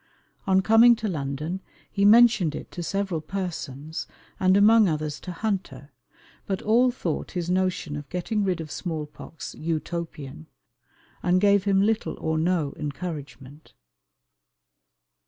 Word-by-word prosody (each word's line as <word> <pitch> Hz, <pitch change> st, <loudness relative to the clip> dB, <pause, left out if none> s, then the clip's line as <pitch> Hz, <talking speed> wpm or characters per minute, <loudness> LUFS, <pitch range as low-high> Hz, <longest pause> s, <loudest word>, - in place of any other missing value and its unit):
On 190 Hz, 0 st, +4 dB
coming 225 Hz, +4 st, +6 dB
to 220 Hz, -1 st, -4 dB
London 155 Hz, +2 st, -3 dB, 0.3 s
he 200 Hz, 0 st, +1 dB
mentioned 215 Hz, -7 st, +6 dB
it -, -, -8 dB
to 175 Hz, -, -6 dB
several 195 Hz, -2 st, -2 dB
persons, 160 Hz, -4 st, -5 dB, 0.3 s
and 185 Hz, +1 st, +4 dB
among 215 Hz, 0 st, +6 dB
others 150 Hz, -2 st, -3 dB
to 180 Hz, -, -7 dB
Hunter; 170 Hz, -, -4 dB, 0.6 s
but 195 Hz, -1 st, -1 dB
all 240 Hz, +4 st, +4 dB
thought 180 Hz, -, -4 dB
his 175 Hz, -1 st, -2 dB
notion 185 Hz, -5 st, 0 dB
of 145 Hz, -1 st, -7 dB
getting 205 Hz, +4 st, -1 dB
rid 185 Hz, -3 st, 0 dB
of 155 Hz, -2 st, -7 dB
small 160 Hz, -4 st, -4 dB
pox 150 Hz, +1 st, -10 dB
Utopian, 155 Hz, -, -5 dB, 0.7 s
and 180 Hz, +1 st, +2 dB
gave 200 Hz, 0 st, +3 dB
him 195 Hz, -1 st, +3 dB
little 220 Hz, +1 st, 0 dB
or 160 Hz, 0 st, -1 dB
no 165 Hz, -4 st, 0 dB
encouragement. 145 Hz, -1 st, -7 dB
175 Hz, 135 wpm, -25 LUFS, 155-200 Hz, 0.7 s, coming